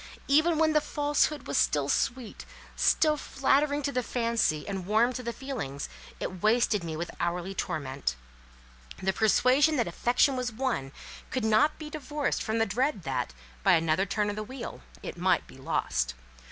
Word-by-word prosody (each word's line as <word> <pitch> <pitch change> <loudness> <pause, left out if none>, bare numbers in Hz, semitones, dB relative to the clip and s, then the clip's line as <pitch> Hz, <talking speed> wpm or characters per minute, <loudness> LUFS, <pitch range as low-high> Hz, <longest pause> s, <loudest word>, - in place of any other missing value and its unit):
Even 315 +4 +4
when 315 0 +3
the 305 - +4
Falsehood 295 0 0
was 140 - +1
still 145 -2 +2
sweet, 240 - -1 0.3
still 305 -1 +3
flattering 285 +1 +1
to 280 - 0
the 250 - 0
fancy, 230 -11 0
and 190 -3 -4
warm 225 +4 +3
to 255 - -4
the 235 -1 -3
feelings, 230 - -5 0.3
it 185 -2 -5
wasted 215 -3 +3
me 160 -2 -4
with 170 +2 -4
hourly 175 +2 -2
torment. 140 - -3 0.8
The 190 0 0
persuasion 255 +9 +4
that 240 -5 +1
affection 250 +3 +2
was 250 -1 -2
won 225 - -2 0.4
could 255 -4 -1
not 220 +8 +3
be 305 -1 -8
divorced 295 -1 -2
from 220 0 -1
the 225 - +3
dread 225 - 0
that, 130 - -2 0.3
by - - +5
another 165 +4 +2
turn 205 0 0
of - - -6
the 215 - -3
wheel, 240 - -7 0.2
it - - -6
might - - +2
be - - -15
lost. - - -1
230 Hz, 170 wpm, -28 LUFS, 180-275 Hz, 0.8 s, by